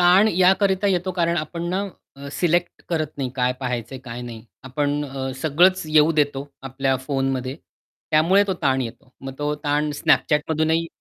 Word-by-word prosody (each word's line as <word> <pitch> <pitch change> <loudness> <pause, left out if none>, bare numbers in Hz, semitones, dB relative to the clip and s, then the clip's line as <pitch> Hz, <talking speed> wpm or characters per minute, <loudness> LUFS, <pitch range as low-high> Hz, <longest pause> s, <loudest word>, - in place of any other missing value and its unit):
ताण 180 +4 +6
याकरिता 190 +1 +3
येतो, 185 -1 +1
कारण 170 -1 0
आपण 170 +2 -4
ना 195 +2 -1 0.3
अ, 140 +1 -8
सिलेक्ट 175 +1 0
करत 160 -3 0
नाही, 130 -2 -2
काय 125 -1 +1
पहायचंय 125 0 -4
काय 120 -1 -6
नाही. 115 -2 -9 0.2
आपण 145 +2 -1
अ, 135 -1 -4
सगळंच 180 +5 +4
येऊ 155 +1 +4
देतो 145 -2 0
आपल्या 135 0 -1
फोनमध्ये, 135 -1 -1 0.5
त्यामुळे 170 +6 +4
तो 190 - -1
ताण 135 -1 +2
येतो. 125 +2 -9
मग 135 0 -6
तो 145 0 -1
ताण 150 +1 +1
Snapchat 150 - +3
मधूनही 160 +1 +1
150 Hz, 165 wpm, -22 LUFS, 135-175 Hz, 0.5 s, ताण